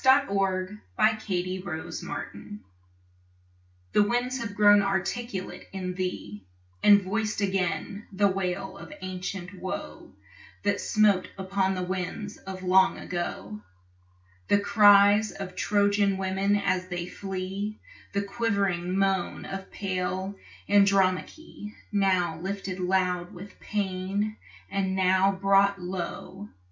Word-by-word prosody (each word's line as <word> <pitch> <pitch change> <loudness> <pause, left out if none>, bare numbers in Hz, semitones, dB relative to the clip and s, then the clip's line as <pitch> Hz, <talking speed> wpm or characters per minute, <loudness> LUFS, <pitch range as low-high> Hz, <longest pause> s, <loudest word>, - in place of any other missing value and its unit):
To 260 - +5
an 195 -4 -1 0.2
Aeolian 190 -4 +1 0.2
Harp 160 - -6 1.6
The - - +5
winds 245 +5 0
have 215 -3 -5
grown 205 0 +7
articulate 195 +1 -3
in 185 -1 -4
thee, 180 - -4 0.4
And 205 -1 +7
voiced 215 +3 -1
again 195 +1 -1
the 200 +1 +3
wail 190 0 -2
of - - -10
ancient 185 0 -5
woe 185 0 -6 0.5
That 200 0 +1
smote 210 -4 +3
upon 190 0 0
the 185 - -2
winds 190 +3 -4
of 190 -1 -8
long 190 +1 +4
ago: 105 - -5 0.9
The - - +4
cries 205 0 +6
of 185 -2 -7
Trojan 200 -1 +2
women 195 +1 +1
as 185 -2 0
they 175 -2 -3
flee, 195 +3 -4 0.4
The 200 0 0
quivering 195 -5 0
moan 195 -2 0
of 195 0 -6
pale 190 0 -3 0.3
Andromache, 200 - +1 0.2
Now 185 -5 +1
lifted 190 0 -4
loud 180 -1 0
with 195 +3 -11
pain 200 +1 -2 0.3
and 190 -1 0
now 190 +1 +4
brought 195 +1 +3
low. 185 +2 -6
195 Hz, 110 wpm, -27 LUFS, 185-205 Hz, 1.6 s, grown